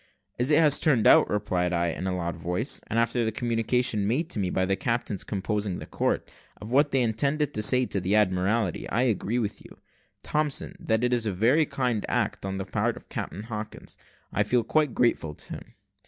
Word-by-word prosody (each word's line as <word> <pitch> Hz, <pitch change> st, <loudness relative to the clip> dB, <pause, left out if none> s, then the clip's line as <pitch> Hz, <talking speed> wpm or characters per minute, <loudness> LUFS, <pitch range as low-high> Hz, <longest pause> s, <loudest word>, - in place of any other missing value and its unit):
"As 125 Hz, +3 st, +1 dB
it 150 Hz, -, +5 dB
has 150 Hz, -3 st, +6 dB
turned 130 Hz, -9 st, +2 dB
out," -, -, +6 dB
replied 90 Hz, -4 st, -1 dB
I, 85 Hz, 0 st, +1 dB
in 90 Hz, +3 st, -4 dB
a 95 Hz, -, -1 dB
loud 85 Hz, -1 st, -3 dB
voice, 90 Hz, -, -2 dB
"and 115 Hz, -, -2 dB
after 115 Hz, +1 st, +1 dB
the 110 Hz, -, 0 dB
communication 115 Hz, -1 st, 0 dB
made 155 Hz, +10 st, -1 dB
to -, -, -2 dB
me 95 Hz, -2 st, 0 dB
by 95 Hz, +1 st, 0 dB
the 95 Hz, +1 st, +1 dB
captains 115 Hz, -3 st, -2 dB
composing 100 Hz, -2 st, -2 dB
the -, -, -8 dB
court, -, -, -1 dB, 0.3 s
of 105 Hz, +3 st, -9 dB
what 145 Hz, +3 st, +4 dB
they 135 Hz, -2 st, +2 dB
intend 140 Hz, +6 st, 0 dB, 0.2 s
to 105 Hz, -, -2 dB
say 125 Hz, +4 st, +5 dB
to 100 Hz, -, -2 dB
the 95 Hz, +3 st, +1 dB
Admiralty, 100 Hz, 0 st, +1 dB
I 120 Hz, -, +1 dB
agree 115 Hz, -1 st, 0 dB
with 110 Hz, -4 st, -3 dB
you, -, -, -15 dB, 0.5 s
Thompson, 150 Hz, -2 st, -1 dB
that 110 Hz, +1 st, 0 dB
it 125 Hz, 0 st, +2 dB
is 115 Hz, -2 st, 0 dB
a -, -, 0 dB
very 125 Hz, -, +2 dB
kind 125 Hz, -5 st, -1 dB
act -, -, -1 dB
on 95 Hz, 0 st, -3 dB
the 95 Hz, -, -4 dB
part -, -, -1 dB
of -, -, -15 dB
Captain 100 Hz, -, -5 dB
Hawkins, 110 Hz, -1 st, -7 dB, 0.4 s
and -, -, -4 dB
I -, -, +5 dB
feel 120 Hz, +3 st, +2 dB
quite 150 Hz, +2 st, +1 dB
grateful 80 Hz, -11 st, +1 dB
to -, -, -7 dB
him." -, -, -11 dB
110 Hz, 215 wpm, -26 LUFS, 95-125 Hz, 0.5 s, has